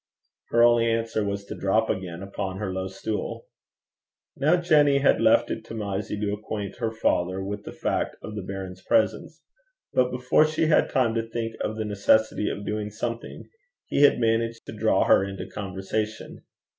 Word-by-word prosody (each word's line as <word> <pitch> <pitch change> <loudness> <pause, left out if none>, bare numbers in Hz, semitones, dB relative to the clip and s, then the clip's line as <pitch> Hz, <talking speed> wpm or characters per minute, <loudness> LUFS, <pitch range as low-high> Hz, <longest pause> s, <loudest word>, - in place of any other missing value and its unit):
Her 115 0 +4
only 120 -1 +5
answer 115 -1 -1
was 100 0 -3
to - - -7
drop 110 +3 +1
again 90 -2 -4
upon 95 -1 -4
her 95 -2 -3
low 95 0 -3
stool. 105 +3 -4 0.9
Now 150 +5 +3
Jenny 150 -5 +4
had 140 0 +3
left - - +4
it - - -4
to 115 - -8
Mysie 100 -1 -3
to 105 -1 0
acquaint 105 -1 -5
her 115 -2 -1
father 95 -4 0
with 100 +1 -5
the - - -6
fact - - -2
of 110 - -7
the 105 - -3
baron's 95 -1 -7
presence; 285 - 0 0.5
but 125 0 +3
before 125 +5 +3
she 155 +1 0
had 155 - +3
time 125 -5 +2
to 115 0 -2
think 115 -1 -3
of 110 - -2
the 110 0 -3
necessity 105 +1 +2
of 100 - -5
doing 105 0 -2
something, 115 +2 -5 0.4
he - - 0
had 145 - +6
managed 115 0 0
to - - -8
draw - - +2
her - - +5
into 95 0 -5
conversation. 100 +2 -5
110 Hz, 180 wpm, -25 LUFS, 100-115 Hz, 0.9 s, had